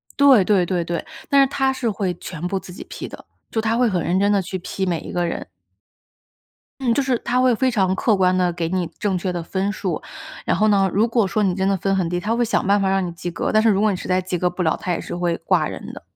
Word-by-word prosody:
对 275 -7 +6
对 195 -3 +3
对 175 -1 -1
对。 170 0 -3 0.2
但 280 0 +5
是 275 - +5
她 265 -1 +1
是 245 -3 -1
会 195 -3 -2
全 170 -1 -7
部 195 - -1
自 185 - -12
己 180 - -9
批 - - -7
的， - - -11 0.3
就 225 - -1
她 220 +1 +1
会 245 -1 +3
很 180 -4 0
认 175 +4 +1
真 200 +1 +3
地 200 -1 +3
去 185 +1 -5
批 190 +2 -3
每 175 -3 -1
一 - - -8
个 175 0 0
人。 - - -4 1.4
嗯， 240 -3 +2
就 280 - +2
是 255 -2 0
她 245 +2 -1
会 255 -2 +4
非 260 +3 +1
常 190 -6 +1
客 215 +2 +2
观 185 -1 +3
地 180 -1 +2
给 170 -1 -2
你 180 -2 -1
正 200 -3 0
确 185 +1 -2
的 175 -1 -3
分 190 +4 -2
数。 205 - -3 0.5
然 - - +2
后 215 - +3
呢， 195 -2 +3
如 210 +4 +3
果 230 -3 +1
说 210 +3 0
你 190 -3 +2
真 190 +1 0
的 195 - +2
分 195 +2 0
很 185 -3 0
低， 175 +1 -1
她 210 +5 -1
会 240 - +1
想 235 -4 0
办 200 +1 +3
法 195 - +1
让 190 -1 +1
你 175 - -5
及 175 +1 -5
格。 - - -2
但 215 0 +4
是 225 - +4
如 200 -1 +3
果 215 - +4
你 195 - -1
实 - - -7
在 185 0 +2
及 180 0 -3
格 180 +1 +2
不 180 +1 -4
了， 160 - +2
她 180 - -2
也 170 - -2
是 - - -6
会 175 -1 0
挂 - - +2
人 - - -7
的。 - - -10
195 Hz, 310 characters per minute, -21 LUFS, 180-220 Hz, 1.4 s, 对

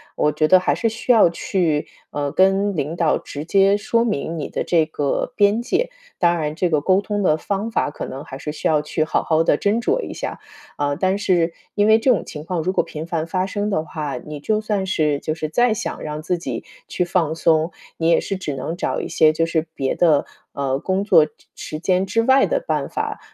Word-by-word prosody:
我 150 - +2
觉 155 +1 +1
得 185 - +7
还 180 - +1
是 230 - 0
需 225 +3 -1
要 220 -7 +6
去， 165 -3 -1 0.2
呃， 145 -1 -3
跟 195 +1 +3
领 150 +1 -2
导 165 -3 +2
直 145 +2 -7
接 195 +3 +4
说 230 +3 +1
明 170 -7 -2
你 150 - -4
的 - - -2
这 165 -3 +3
个 145 - -2
边 205 +2 +3
界。 480 - 0 0.3
当 175 -1 +3
然 150 -2 -2
这 180 +1 0
个 155 -3 +2
沟 185 +5 +3
通 205 0 -2
的 155 -4 +3
方 200 +6 -3
法， 150 - 0
可 - - -6
能 135 +2 -7
还 135 - -8
是 150 - -4
需 150 - -2
要 155 -2 +3
去 150 +1 -1
好 - - 0
好 160 0 +2
地 145 - +3
斟 205 +6 +1
酌 - - +1
一 - - -6
下。 - - -5 0.4
啊， 145 0 0
但 185 +4 +1
是， 175 -4 +1 0.2
因 205 - +3
为 220 +1 +6
这 245 - +1
种 235 -8 +3
情 150 -1 -8
况 165 0 -2
如 185 +3 0
果 - - +2
频 155 0 -7
繁 165 -1 -2
发 185 +2 0
生 205 +2 -2
的 155 -6 0
话， 150 -4 -4
你 150 +4 -8
就 215 +8 0
算 210 -3 -2
是 150 -6 +1
就 155 - -3
是 155 -1 -3
再 240 +8 +3
想 - - -4
让 150 0 -5
自 180 - 0
己 170 - -4 0.2
去 - - -1
放 170 -3 0
松， 160 0 +2 0.3
你 165 0 +1
也 170 - +5
是 195 - -3
只 170 -6 -4
能 135 +5 -4
找 180 - -2
一 - - -4
些 155 - +4
就 165 +1 0
是 165 -1 -1
别 135 -1 -1
的， 155 -5 +3 0.3
呃， 135 -1 -1
工 190 +5 -1
作 160 -7 +5
时 - - -12 0.3
时 155 - -6
间 185 +2 +1
之 230 +4 +1
外 265 +3 +4
的 - - +1
办 - - -1
法， - - -3
170 Hz, 255 characters per minute, -21 LUFS, 155-200 Hz, 0.4 s, 得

